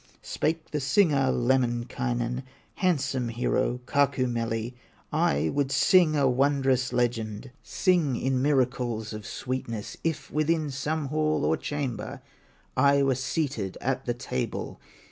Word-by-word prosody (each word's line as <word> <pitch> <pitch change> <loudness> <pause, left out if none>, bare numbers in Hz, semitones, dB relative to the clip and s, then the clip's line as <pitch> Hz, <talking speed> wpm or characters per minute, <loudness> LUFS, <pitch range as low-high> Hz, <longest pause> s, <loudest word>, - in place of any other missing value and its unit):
Spake 160 +1 -2
the 150 - -1
singer, 140 -1 +3
Lemminkainen, 120 0 0 0.4
Handsome 140 -8 +1
hero, 120 +1 0
Kaukomieli: 120 -4 0 0.4
"I 75 +3 +2
would 140 - 0
sing 155 +3 +5
a 140 -2 +3
wondrous 135 -1 +2
legend, 120 -1 -1
Sing 170 -8 +1
in 130 +1 0
miracles 125 -5 0
of 105 -1 -7
sweetness, 115 -4 -4
If 165 -2 -2
within 155 0 +1
some 145 +2 -2
hall 155 0 +1
or - - +3
chamber, 140 -5 -4 0.6
I 140 +1 +4
were 135 -1 +3
seated 130 - -2
at - - -2
the - - -1
table. 65 - -4
130 Hz, 120 wpm, -27 LUFS, 120-145 Hz, 0.6 s, sing